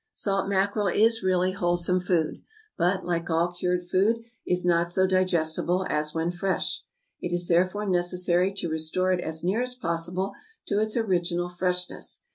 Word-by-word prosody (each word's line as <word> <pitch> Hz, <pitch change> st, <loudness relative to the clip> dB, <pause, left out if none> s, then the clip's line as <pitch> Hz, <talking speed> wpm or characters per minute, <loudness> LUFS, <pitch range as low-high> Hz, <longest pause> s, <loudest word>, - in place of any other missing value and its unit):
Salt 195 Hz, -1 st, 0 dB
mackerel 200 Hz, +1 st, +1 dB
is 225 Hz, +4 st, +3 dB
really 185 Hz, -1 st, +2 dB
wholesome 175 Hz, 0 st, +1 dB
food, 175 Hz, -3 st, 0 dB, 0.3 s
but, 185 Hz, +2 st, +1 dB
like 170 Hz, -1 st, -1 dB
all 170 Hz, +2 st, +2 dB
cured 180 Hz, 0 st, -1 dB
food, 200 Hz, +6 st, +1 dB, 0.2 s
is 180 Hz, 0 st, +1 dB
not 170 Hz, -1 st, +3 dB
so 190 Hz, +2 st, +3 dB
digestible 185 Hz, -1 st, +1 dB
as 150 Hz, 0 st, 0 dB
when 165 Hz, +2 st, -1 dB
fresh: 185 Hz, +2 st, -1 dB, 0.4 s
it 175 Hz, -, -3 dB
is 175 Hz, 0 st, -1 dB
therefore 185 Hz, +4 st, +2 dB
necessary 180 Hz, 0 st, +1 dB
to 195 Hz, -3 st, -4 dB
restore 160 Hz, +4 st, 0 dB
it 180 Hz, -, +2 dB
as 160 Hz, 0 st, -3 dB
near 195 Hz, +7 st, +1 dB
as 250 Hz, 0 st, -1 dB
possible 175 Hz, -1 st, -2 dB, 0.3 s
to 200 Hz, -, 0 dB
its 215 Hz, +2 st, 0 dB
original 175 Hz, -5 st, 0 dB
freshness. 180 Hz, 0 st, -2 dB
180 Hz, 160 wpm, -26 LUFS, 175-190 Hz, 0.4 s, is